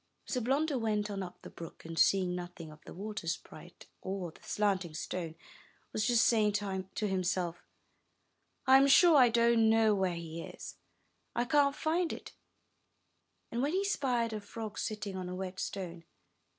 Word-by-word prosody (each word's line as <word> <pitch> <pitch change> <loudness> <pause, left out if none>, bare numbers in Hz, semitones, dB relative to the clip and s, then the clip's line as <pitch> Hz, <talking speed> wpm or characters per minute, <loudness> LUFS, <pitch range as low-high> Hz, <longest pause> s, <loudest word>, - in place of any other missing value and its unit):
So 250 - -2
Blunder 275 +3 +1
went 210 -2 0
on 195 -1 -3
up 180 -2 -8
the - - -9
brook, 165 -1 -10
and, 165 0 -4
seeing 185 -2 +4
nothing 175 -3 -7
of 150 - -15
the - - -9
water 205 -2 -5
sprite, 170 - -6 0.2
or 190 -3 -4
the - - -20
slanting 190 -6 0
stone, 165 0 -4 0.6
was 215 +1 0
just 240 -2 +4
saying 215 -3 +3
to 195 +1 -2
himself, 180 -2 -1 1.0
'*I 265 0 +8
am 275 +1 +5
sure 330 +4 +7
I 255 -4 +7
don't 235 -1 +4
know 220 -1 +5
where 190 -3 0
he 165 0 -6
is, - - -9 0.3
— - - -44
I 240 - +1
can't 280 +1 +3
find 330 +3 0
it," - - -8 1.2
when 265 +7 0
he 390 +2 +1
spied 245 - 0
a 215 - -4
frog 215 +1 -7
sitting 210 -2 -3
on 185 -1 -4
a 180 - -4
wet 185 0 -5
stone. 175 -4 -5
210 Hz, 170 wpm, -32 LUFS, 180-235 Hz, 1.2 s, I